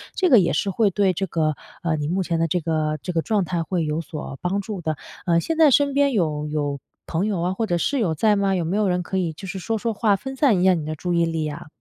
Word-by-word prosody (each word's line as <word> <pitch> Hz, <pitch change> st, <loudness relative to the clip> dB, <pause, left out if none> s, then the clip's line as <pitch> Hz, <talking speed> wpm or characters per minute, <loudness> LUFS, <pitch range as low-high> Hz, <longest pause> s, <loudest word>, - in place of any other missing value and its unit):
这 370 Hz, -2 st, +2 dB
个 250 Hz, -7 st, +8 dB
也 175 Hz, -, +1 dB
是 200 Hz, -, 0 dB
会 205 Hz, +2 st, +2 dB
对 195 Hz, 0 st, +2 dB
这 195 Hz, +3 st, -2 dB
个 155 Hz, -3 st, 0 dB, 0.3 s
呃， 165 Hz, -2 st, +1 dB
你 145 Hz, -1 st, -2 dB
目 185 Hz, +4 st, 0 dB
前 165 Hz, -1 st, -1 dB
的 165 Hz, -, +2 dB
这 180 Hz, +3 st, 0 dB
个 155 Hz, -1 st, -1 dB
这 180 Hz, -, -4 dB
个 165 Hz, -, +1 dB
状 210 Hz, +1 st, +1 dB
态 170 Hz, -1 st, -1 dB
会 170 Hz, 0 st, -1 dB
有 150 Hz, +1 st, -1 dB
所 150 Hz, -3 st, -7 dB
帮 195 Hz, +3 st, -1 dB
助 205 Hz, -1 st, -6 dB
的。 155 Hz, -2 st, -2 dB, 0.3 s
呃， 170 Hz, -2 st, +3 dB
现 325 Hz, -, -2 dB
在 315 Hz, -3 st, +6 dB
身 280 Hz, +1 st, +3 dB
边 280 Hz, 0 st, +3 dB
有 155 Hz, -7 st, 0 dB
有 145 Hz, -2 st, -2 dB, 0.3 s
朋 170 Hz, +4 st, -1 dB
友 200 Hz, -5 st, -1 dB
啊， 180 Hz, +2 st, 0 dB
或 225 Hz, +4 st, -1 dB
者 175 Hz, -5 st, 0 dB
室 275 Hz, +10 st, 0 dB
友 180 Hz, -8 st, +1 dB
在 210 Hz, +6 st, +3 dB
吗？ 200 Hz, -1 st, +1 dB
有 175 Hz, -, 0 dB
没 175 Hz, +5 st, -1 dB
有 210 Hz, -2 st, +2 dB
人 180 Hz, 0 st, +1 dB
可 190 Hz, -, -3 dB
以 170 Hz, -3 st, -1 dB
就 190 Hz, +5 st, -9 dB
是 190 Hz, +1 st, -5 dB
说 225 Hz, +5 st, -2 dB
说 225 Hz, +1 st, -2 dB
话， 210 Hz, -1 st, +2 dB
分 265 Hz, +7 st, -6 dB
散 255 Hz, -10 st, +3 dB
一 -, -, +2 dB
下 190 Hz, -, +6 dB
你 160 Hz, -3 st, -4 dB
的 155 Hz, +1 st, -3 dB
注 175 Hz, +3 st, -3 dB
意 170 Hz, 0 st, +3 dB
力 165 Hz, -2 st, -2 dB
啊？ 145 Hz, 0 st, -7 dB
180 Hz, 315 characters per minute, -23 LUFS, 160-205 Hz, 0.3 s, 个